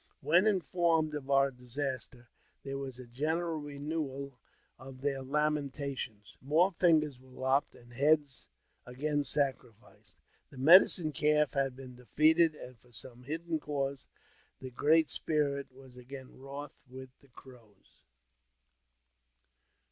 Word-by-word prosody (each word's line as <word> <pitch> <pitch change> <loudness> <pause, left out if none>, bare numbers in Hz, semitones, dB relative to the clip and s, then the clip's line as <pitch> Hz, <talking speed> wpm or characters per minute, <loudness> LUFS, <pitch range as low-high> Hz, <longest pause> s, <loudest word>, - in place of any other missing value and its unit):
When 175 +6 +4
informed 170 -5 +1
of 145 -3 -5
oui* 140 0 +3
disaster, 125 -1 -5 0.3
there 135 0 -4
was 135 -2 -6
a 130 - -10
general 160 +6 -2
renewal 140 -2 -5 0.4
of 130 0 -11
their 140 -1 -1
lamentations; 140 -6 -3
more 160 +8 +3
fingers 155 -7 +2
were 130 0 -19
lopped, 130 +2 0
and 120 0 -16
heads 145 +1 +1 0.4
again 145 +4 -2
scarified. 130 -6 -3 0.5
The 135 - -14
Medicine 160 +2 +6
Calf 150 +1 +2
had 135 -3 0
been 130 -1 -10
defeated, 155 +6 +3
and 125 -4 -11
for 125 +2 -24
some 120 +2 -11
hidden 160 +4 -3
cause 140 -2 -3 0.5
the 130 -1 -8
Great 155 +5 +3
Spirit 140 -3 -1
was 130 -1 -16
again 130 +1 -10
wroth 140 +2 -9
with 130 0 -10
the 140 - -23
Crows. 120 -6 -18
140 Hz, 125 wpm, -32 LUFS, 130-150 Hz, 0.5 s, Medicine